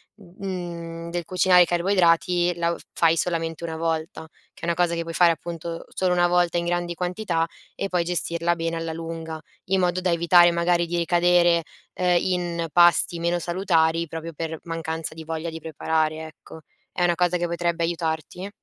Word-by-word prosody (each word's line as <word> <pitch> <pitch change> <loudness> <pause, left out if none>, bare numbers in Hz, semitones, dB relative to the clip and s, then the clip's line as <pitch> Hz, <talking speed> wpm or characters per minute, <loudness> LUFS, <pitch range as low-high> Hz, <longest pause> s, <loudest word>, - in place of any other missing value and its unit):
mhmm, 175 -4 -7
del 175 0 -2
cucinare 180 0 +4
i - - 0
carboidrati 175 0 +2
la 170 0 0
u - - -4
f - - -16
fai 165 -1 +3
solamente 165 -1 -2
una 160 -1 -4
volta, 160 0 -3 0.3
che - - -19
è - - -1
una 170 - +1
cosa 175 0 +1
che 170 - -2
puoi 165 0 -7
fare, 170 0 +6
appunto, 165 0 -7
solo 185 -1 0
una 175 0 +3
volta 175 -1 +2
in 170 - -3
grandi 175 0 -1
quantità 180 -2 -1 0.3
e 195 - -2
poi 180 -2 +1
gestirla 170 0 0
bene 165 0 -2
alla 165 0 -3
lunga, 165 -1 -6 0.3
in 190 0 +1
modo 180 0 +1
da 180 -1 +1
evitare, 175 +1 +5
magari, 170 0 +1
di 175 +1 -2
ricadere, 175 0 +3 0.3
uhm, 180 -1 +2
in 175 -2 -2
pasti 175 0 +4
meno 170 +1 0
salutari 170 -2 +1
proprio 165 +1 -7
per 160 0 -5
mancanza 165 -1 -4
di 160 0 -9
voglia 160 +1 -4
di 160 0 -7
preparare, 160 0 -1
ecco. 160 0 -14 0.3
È - - -1
una 175 -1 +2
cosa 180 0 +1
che 175 0 -1
potrebbe 170 0 -1
aiutarti? 165 +2 -3
170 Hz, 185 wpm, -24 LUFS, 165-175 Hz, 0.3 s, fare